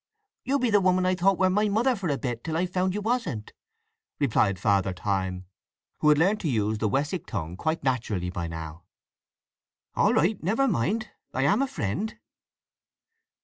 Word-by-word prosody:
You 275 Hz, +3 st, +1 dB
be 250 Hz, -4 st, 0 dB
the 205 Hz, -1 st, +5 dB
woman 185 Hz, 0 st, +3 dB
I 185 Hz, -, +3 dB
thought 185 Hz, +1 st, +2 dB
wer 185 Hz, 0 st, +3 dB
my 210 Hz, +2 st, +2 dB
mother 240 Hz, +5 st, +2 dB
for 190 Hz, -5 st, -3 dB
a 140 Hz, -, 0 dB
bit, 120 Hz, -4 st, -4 dB
till 160 Hz, -1 st, -2 dB
I 180 Hz, -, +1 dB
found 185 Hz, +1 st, -1 dB
you 210 Hz, -, -2 dB
wasn't," 220 Hz, -, -2 dB, 0.7 s
replied 110 Hz, -8 st, +2 dB
Father 100 Hz, -1 st, +1 dB
Time, 95 Hz, -1 st, -2 dB, 0.5 s
who 150 Hz, -, +4 dB
had 150 Hz, -, +5 dB
learned 195 Hz, +7 st, +3 dB
to 165 Hz, -, -2 dB
use 110 Hz, -3 st, 0 dB
the 110 Hz, -, +1 dB
Wessex 145 Hz, -, -1 dB
tongue 85 Hz, -6 st, -4 dB
quite 160 Hz, -, -2 dB
naturally 110 Hz, -9 st, -1 dB
by 85 Hz, -2 st, -3 dB
now. 80 Hz, 0 st, -7 dB, 1.1 s
"All -, -, +3 dB
right. 185 Hz, +7 st, +2 dB
Never 225 Hz, +11 st, +1 dB
mind. 210 Hz, -, 0 dB, 0.3 s
I 130 Hz, -, +1 dB
am 205 Hz, -, +3 dB
a 275 Hz, -, +1 dB
friend." 205 Hz, -, -3 dB
155 Hz, 180 wpm, -26 LUFS, -, 1.1 s, the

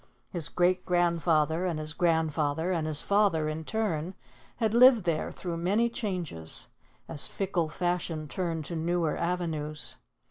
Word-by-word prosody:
His 165 Hz, -4 st, -4 dB
great 180 Hz, +1 st, +2 dB
grandfather 170 Hz, -2 st, +2 dB
and 170 Hz, -3 st, -1 dB
his 155 Hz, 0 st, -3 dB
grandfather 160 Hz, -1 st, +1 dB
and 165 Hz, -3 st, 0 dB
his 155 Hz, -2 st, +2 dB
father, 200 Hz, -7 st, +2 dB
in 155 Hz, +1 st, -3 dB
turn, 185 Hz, -3 st, -2 dB, 0.4 s
had 220 Hz, -2 st, 0 dB
lived 240 Hz, -2 st, +7 dB
there 165 Hz, -3 st, -1 dB
through 175 Hz, -2 st, -5 dB
many 205 Hz, +8 st, +2 dB
changes, 180 Hz, -, -3 dB, 0.4 s
as 155 Hz, -4 st, +1 dB
fickle 185 Hz, -5 st, -1 dB
fashion 170 Hz, -2 st, -2 dB
turned 165 Hz, -1 st, -3 dB
to 170 Hz, -, -5 dB
newer 165 Hz, 0 st, 0 dB
avenues. 160 Hz, -4 st, -3 dB
170 Hz, 140 wpm, -29 LUFS, 155-180 Hz, 0.4 s, lived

